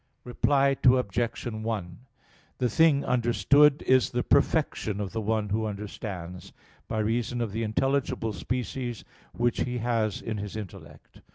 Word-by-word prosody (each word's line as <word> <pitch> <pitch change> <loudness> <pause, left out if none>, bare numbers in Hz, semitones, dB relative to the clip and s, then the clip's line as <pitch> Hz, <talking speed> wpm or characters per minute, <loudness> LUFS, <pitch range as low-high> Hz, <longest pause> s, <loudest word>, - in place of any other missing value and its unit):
Reply 135 +2 +2
Obj. 120 -2 +2
1: 110 -6 -4 0.6
The 125 -2 +1
thing 145 +3 +4
understood 135 +4 +3
is 130 -1 +3
the - - -1
perfection 105 -2 +1
of 100 -2 -3
the 110 - -3
one 110 -1 -1
who 110 +2 0
understands, 100 -4 -7 0.3
by 110 - -3
reason 115 +2 -1
of 115 -3 -2
the 110 +3 -3
intelligible 115 0 0
species 125 +3 -4 0.3
which 120 0 0
he 125 -1 -1
has 115 -3 0
in 110 -2 -4
his 105 0 -6
intellect. 105 -5 -10
115 Hz, 140 wpm, -27 LUFS, 105-125 Hz, 0.6 s, thing